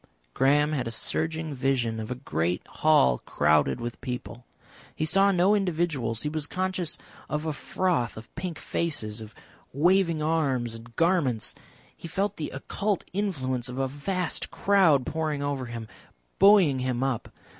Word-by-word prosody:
Graham 145 +3 +3
had 130 -6 -1
a 115 - -3
surging 160 -1 -1
vision 125 -4 0
of 110 - -5
a 125 - -2
great 90 - -2
hall 65 - +3
crowded 75 -3 +2
with 120 0 -6
people. 125 -1 -6 0.5
He 155 - -1
saw 195 +5 +4
no 185 +2 +4
individuals, 165 - 0
he 150 - 0
was 155 -1 -2
conscious 185 -2 -1 0.3
of 150 +1 -2
a 155 - -1
froth 145 -5 -1
of 110 - -11
pink 180 -3 -5
faces, 115 -10 -3
of 110 +1 -10 0.4
waving 170 +1 +3
arms 135 -7 0
and 115 +1 -12
garments, 165 - +2 0.4
he - - -9
felt 195 +4 -1
the 155 - -3
occult 200 +8 -2
influence 130 - -1
of 125 - -6
a 135 0 +1
vast 170 +6 -2
crowd 180 -10 +3
pouring 155 -2 -2
over 140 -3 -2
him, 115 -1 -6 0.5
buoying 195 -9 +6
him 130 0 -1
up. 135 -4 -2
145 Hz, 155 wpm, -27 LUFS, 125-170 Hz, 0.5 s, buoying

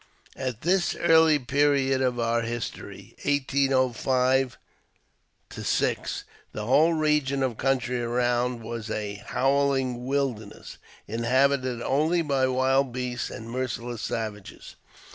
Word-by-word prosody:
At 125 -4 -4
this 180 +2 +1
early 160 -2 +5
period 140 0 +1
of 125 -2 0
our 115 0 +1
history 115 0 -6
(1805 130 -2 +1 0.9
6) - - -1 0.3
the 105 - -4
whole 155 +8 +4
region 150 -3 +1
of 125 -4 -2
country 125 -2 0
around 120 0 0
was 115 -1 -6
a 105 -2 -4
" - - -17
howHng 135 -2 +1
wilderness," 130 -6 -3 0.3
inhabited 130 +2 +1
only 160 +5 +1
by 135 -3 +1
wild 130 +1 +2
beasts 125 0 -3
and 110 - -8
merciless 120 -2 -4
savages. 105 -3 -5
130 Hz, 110 wpm, -26 LUFS, 120-140 Hz, 0.9 s, early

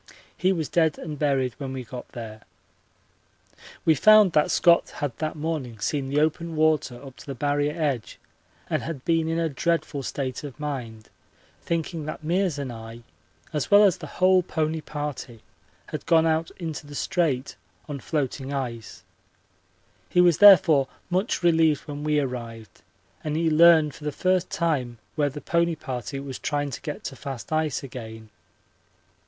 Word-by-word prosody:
He 185 +4 +2
was 165 -6 -1
dead 160 -3 +2
and 150 -4 -7
buried 135 -4 +1
when 135 -2 -5
we 130 -1 -5
got 125 +1 -8
there. 110 -2 -8 1.4
We 160 - +6
found 215 +5 +6
that 150 -2 +3
Scott 170 -1 +4
had 140 -5 -3
that 155 0 -2
morning 150 -7 -4
seen 135 +6 -2
the 145 +2 +1
open 160 +2 0
water 155 -5 +1
up 135 -2 -12
to - - -13
the 140 - -5
Barrier 145 +3 0
edge 140 -8 -2 0.5
and - - -1
had 155 -6 -6
been 165 -1 +2
in 165 - 0
a 165 -1 +1
dreadful 160 0 -1
state 130 0 -4
of 145 -1 -8
mind, 120 -7 -5 0.5
thinking 165 -1 -3
that 155 +1 -6
Meares 175 0 0
and 135 -4 -4
I, 115 +1 -10 0.5
as 150 -3 -2
well 205 +1 +7
as 195 -4 +4
the - - -8
whole 185 0 +5
pony 160 -2 -2
party, 145 -7 -6 0.5
had - - -6
gone 165 -1 +5
out 160 0 +1
into 160 -4 -6
the 145 - -9
Strait 140 -6 -1 0.3
on 145 -2 -5
floating 140 -2 -3
ice. 115 -9 -5 1.1
He 180 - +1
was 175 -3 +5
therefore 170 -9 +7 0.2
much 185 +1 0
relieved 160 -3 +4
when 145 0 -7
we 150 -1 +2
arrived 120 -5 -6 0.4
and 155 0 -2
he 165 -1 +1
learned 160 -2 +6
for 150 - -13
the 150 - -1
first 185 +3 +1
time 135 -8 -1 0.2
where 145 -2 +1
the 145 +2 -8
pony 170 0 +1
party 135 -2 -5
was 135 -2 -7
trying 145 -1 -2
to - - -6
get 150 - -6
to 135 - -5
fast 135 +1 -6
ice 155 -4 0
again. 110 -4 -9
150 Hz, 170 wpm, -25 LUFS, 135-165 Hz, 1.4 s, well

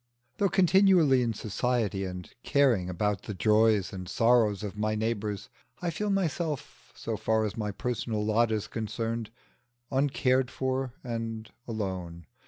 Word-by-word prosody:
Though 200 -1 +2
continually 180 -6 +5
in 115 -2 0
society, 110 -3 -1
and 90 -1 -6
caring 120 -11 +2
about 100 +2 -1
the 105 - -6
joys 110 -1 +3
and 90 -2 -6
sorrows 115 -4 +3
of 100 -1 -5
my 110 +1 0
neighbours, 105 -2 -2 0.3
I 175 -1 -1
feel 210 +6 -2
myself, 155 - -2
so - - -3
far 110 0 +1
as 105 - -3
my 105 -2 -2
personal 110 0 -2
lot 110 +2 +3
is 110 -2 -1
concerned, 115 0 -3 0.6
uncared 130 -2 +2
for 130 -1 -2
and 115 -2 -4 0.2
alone. 95 -6 -4
115 Hz, 140 wpm, -29 LUFS, 105-130 Hz, 0.6 s, continually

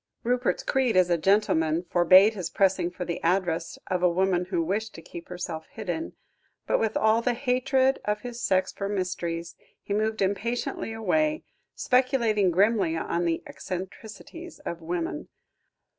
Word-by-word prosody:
Rupert's 245 +1 0
creed 255 -6 +1
as 180 -1 +4
a 170 - +4
gentleman 165 -4 +2
forbade 185 +4 +6
his 185 -5 -4
pressing 190 -3 +2
for 180 0 -6
the 170 - -4
address 175 -1 0
of 180 -1 -1
a 180 - +4
woman 180 0 +1
who 180 -2 -1
wished 215 +6 -2
to 165 - -9
keep 170 0 -10
herself 175 -3 -5
hidden, 225 - -4 0.5
but - - +1
with 220 -1 0
all 220 +1 +3
the 240 0 0
hatred 260 +1 +1
of 210 0 -1
his 240 0 -7
sex 185 -3 +1
for 200 0 -4
mysteries, 175 -3 -3 0.2
he 200 - -5
moved 215 0 0
impatiently 225 +4 -2
away, 305 - 0 0.3
speculating 240 -6 +2
grimly 190 -2 +2
on 170 +1 -1
the 165 -1 -1
eccentricities 215 - -8
of 170 0 -5
women. 170 +1 -4
195 Hz, 155 wpm, -26 LUFS, 175-230 Hz, 0.5 s, forbade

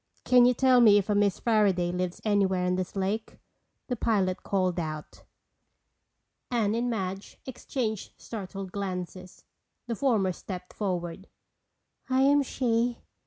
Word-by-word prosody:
"Can 245 -1 +6
you 250 - +3
tell 255 -1 +5
me 210 -3 +7
if 205 +1 0
a - - +3
Miss 205 -2 +2
Fairaday 200 -6 +2
lives 180 -1 -2
anywhere 195 -3 +2
on 180 - +1
this 185 +1 -4
lake?" 200 +3 -2 0.5
the 250 - -1
pilot 200 -5 0
called 185 -3 0
out. 155 -2 -6 1.3
Anne 225 -4 +1
and 240 +2 0
Madge 195 -3 -4
exchanged 235 -4 -4
startled 195 -3 -7
glances. 185 -2 -6 0.4
The 240 - -3
former 215 -7 +2
stepped 180 0 -8
forward. 180 -2 -3 0.8
"I 260 0 +3
am 285 +1 +5
she." 240 -3 0
200 Hz, 135 wpm, -28 LUFS, 185-235 Hz, 1.3 s, me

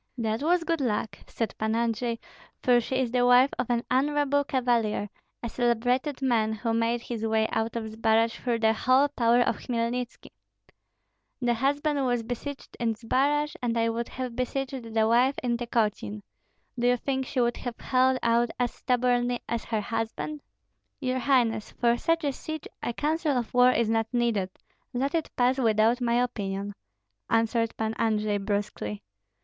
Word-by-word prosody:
"That 225 0 -1
was 340 +3 +2
good 330 -2 -1
luck," 220 -3 -1
said 225 - -3
Pan 220 +1 0
Andrei, 235 0 0 0.5
"for 245 -1 +5
she 260 - -3
is 250 -3 0
the 245 0 +2
wife 250 +2 +6
of 250 - -1
an 240 -1 +1
honorable 285 +2 +2
cavalier, 240 -7 0 0.3
a - - -1
celebrated 250 +4 0
man, 225 -4 +2
who 225 +1 -2
made 230 +1 +1
his 230 -2 -5
way 220 0 +2
out 225 +1 -1
of 225 -1 -3
Zbaraj 225 +1 +2
through 235 -2 -1
the 220 0 +4
whole 260 +5 +3
power 240 -3 +3
of - - +1
Hmelnitski." 240 0 -3 1.1
"The 240 -2 +1
husband 285 +4 0
was 245 -2 0
besieged 250 +4 -6
in 230 -2 0
Zbaraj, 280 +6 0
and 235 -1 -1
I 230 0 +2
would 230 +1 -3
have 255 -2 -5
besieged 255 -1 -3
the 220 0 +2
wife 250 +4 +3
in 240 -1 +1
Tykotsin. 210 - -1 0.6
Do 240 - +2
you 245 0 +4
think 265 +1 -2
she 265 - -2
would 240 -1 +1
have 245 -2 -5
held 260 0 +2
out 235 +1 +3
as 245 -1 0
stubbornly 245 -1 +1
as 235 -1 -3
her 220 -2 -1
husband?" 225 +7 -4 0.6
"Your 260 -2 -1
highness, 240 -5 +1
for 235 -1 +2
such 330 +6 0
a 285 - +1
siege 315 +3 -6
a - - -2
counsel 300 +2 0
of 240 -2 -3
war 250 0 +6
is 235 -2 +2
not 225 0 +1
needed, 235 -6 +1 0.5
let 275 +4 0
it 330 -2 -1
pass 255 +2 +2
without 225 +1 +3
my 235 -1 +1
opinion," 200 -3 -3 0.6
answered 230 0 +1
Pan 220 0 -1
Andrei, 215 -2 +1
brusquely. 200 - -3
240 Hz, 170 wpm, -27 LUFS, 225-255 Hz, 1.1 s, wife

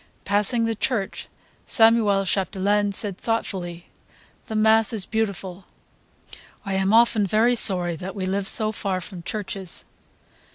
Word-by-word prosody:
Passing 210 +4 +2
the 225 - -1
church, 215 -2 -3 0.4
Samuel 225 -4 +3
Chapdelaine 200 +2 0
said 200 -1 0
thoughtfully 185 -6 -4 0.6
"The 220 - -6
mass 220 +1 +3
is 205 -4 -3
beautiful. 195 -4 -4 1.0
I 195 - -3
am 190 +1 0
often 225 -2 +3
very 220 +5 +2
sorry 180 -7 +5
that 185 +5 -8
we 190 -2 -4
live 195 +1 -2
so 215 +1 +1
far 195 -3 -3
from 185 0 -10
churches. 195 -1 -6
200 Hz, 130 wpm, -23 LUFS, 190-220 Hz, 1.0 s, sorry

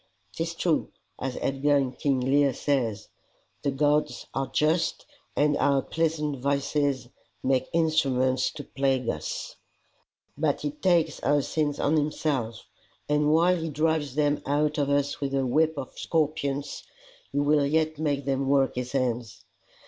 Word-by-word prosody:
"'Tis 165 +1 -3
true, 165 -2 0 0.3
as 130 -1 -3
Edgar 145 +2 +2
in 135 -2 0
King 135 +1 0
Lear 135 0 +3
says: 120 -8 -1 0.5
The - - 0
gods 145 +2 +1
are 135 0 -1
just, 160 +3 +1 0.3
and 145 0 +3
of - - -2
our 140 -1 +3
pleasant 155 -4 -1
vices 140 -1 0 0.3
Make 130 -1 +1
instruments 135 -6 +2
to 150 - -7
plague 135 -3 0
us; 75 - -4 0.8
but 145 -1 0
he 145 - -2
takes 165 -1 +1
our 145 0 +2
sins 150 -1 -1
on 155 +2 +2
himself, 145 -6 -1 0.4
and 150 0 +2
while 175 +3 +4
he 165 -1 -3
drives 155 -2 0
them 145 -1 +1
out 150 +2 0
of 140 -1 +1
us 145 0 0
with 140 -1 -1
a 135 -1 +1
whip 155 +4 +2
of 130 - -6
scorpions 145 -3 -1 0.5
he - - -4
will 145 +1 +3
yet 155 0 +1
make 145 -3 -1
them 135 0 0
work 135 -1 +3
his 125 +2 -4
ends. 120 -3 -2
145 Hz, 150 wpm, -27 LUFS, 135-155 Hz, 0.8 s, while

